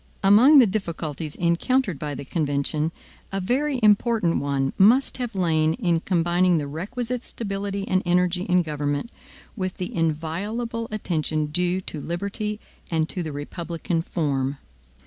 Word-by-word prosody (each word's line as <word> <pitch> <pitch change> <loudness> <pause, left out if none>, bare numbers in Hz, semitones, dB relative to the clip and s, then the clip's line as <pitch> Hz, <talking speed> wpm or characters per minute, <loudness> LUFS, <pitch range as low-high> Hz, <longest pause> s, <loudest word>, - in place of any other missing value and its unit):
Among 230 +10 +7
the 260 - +8
difficulties 165 -7 -3
encountered 180 - +1
by 145 -1 -4
the 140 +1 -7
convention, 150 +1 0 0.4
a 195 - -1
very 260 +8 0
important 210 -3 +3
one 140 -1 -1
must 240 +9 +4
have 245 -4 -4
lain 160 -3 +2
in 175 -8 +1
combining 175 0 +2
the 150 - -1
requisite 235 - -4
stability 200 -2 -4
and 185 -4 +2
energy 180 0 +2
in 180 -1 +3
government, 145 - -2 0.4
with 185 -4 -3
the 180 - -5
inviolable 190 +9 -2
attention 155 -7 -1
due 180 +3 0
to 155 -5 -7
liberty 200 +5 -3 0.3
and 160 -2 +1
to 180 - -2
the 160 -3 -4
republican 165 +3 -3
form. 140 -5 -1
180 Hz, 140 wpm, -24 LUFS, 155-210 Hz, 0.4 s, the